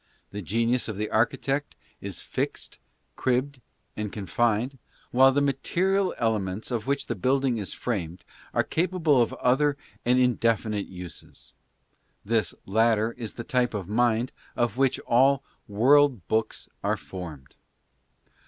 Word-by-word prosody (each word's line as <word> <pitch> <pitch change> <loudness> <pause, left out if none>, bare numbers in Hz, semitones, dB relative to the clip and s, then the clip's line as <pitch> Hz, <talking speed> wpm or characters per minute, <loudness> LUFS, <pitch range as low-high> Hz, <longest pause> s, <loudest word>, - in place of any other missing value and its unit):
The 105 - -5
genius 115 +7 0
of 110 -3 -5
the 105 +1 -3
archi 110 +2 +2
tect 140 +1 -2 0.3
is - - -6
fixed, - - -4 0.4
cribbed 130 +1 0 0.3
and 105 -1 -4
confined, 115 +5 0 0.3
while 130 +2 +6
the 145 +2 +2
material 185 +8 +1
elements 110 -1 -1
of 115 -1 -2
which 140 0 0
the - - -2
building 130 +3 +1
is 100 - -5
framed 90 -7 -4 0.3
are - - +2
capable 165 -6 +2
of 115 - +1
other 140 +3 +2 0.3
and 125 +1 +3
indefi 115 -3 +2
nite 105 -2 -2
uses. 90 -3 -10 0.7
This 110 -5 +1
latter 110 +2 +2
is 115 -3 -7
the 115 - -5
type 125 -3 0
of 95 -4 -4
mind 120 +2 +1 0.2
of 120 0 0
which 135 0 +2
all 135 +3 +3
i; - - -24
world 130 - +4
books" 110 0 -1 0.2
are - - +1
formed. 80 -8 -9
120 Hz, 145 wpm, -26 LUFS, 105-135 Hz, 0.7 s, while